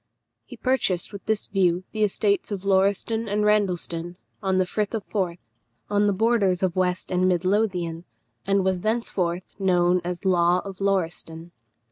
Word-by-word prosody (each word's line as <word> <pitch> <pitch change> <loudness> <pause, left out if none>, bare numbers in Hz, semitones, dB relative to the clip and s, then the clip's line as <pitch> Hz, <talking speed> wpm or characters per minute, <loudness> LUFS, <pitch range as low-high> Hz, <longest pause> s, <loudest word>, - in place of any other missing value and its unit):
He - - -11
purchased 220 -9 0
with 200 - -8
this 220 -1 0
view 185 -3 +1
the 215 -1 0
estates 205 0 +1
of 200 -1 -4
Lauriston 200 +4 +1
and 210 +1 0
Randleston, 180 -5 0 0.3
on 190 -2 +1
the 185 - +3
Firth 210 +4 -2
of 215 - -3
Forth, 180 -5 -2 0.5
on 205 0 +3
the - - +3
borders 200 -3 +2
of 185 -2 +1
West 185 0 -1
and 185 0 +2
Mid 180 -1 +1
Lothian, 180 -5 0 0.4
and 195 -1 +1
was 185 -1 0
thenceforth 185 -5 -1
known 180 -1 +3
as 180 +2 -5
Law 175 -1 +4
of 195 -1 -8
Lauriston. 170 -3 -2
190 Hz, 160 wpm, -24 LUFS, 180-205 Hz, 0.5 s, Law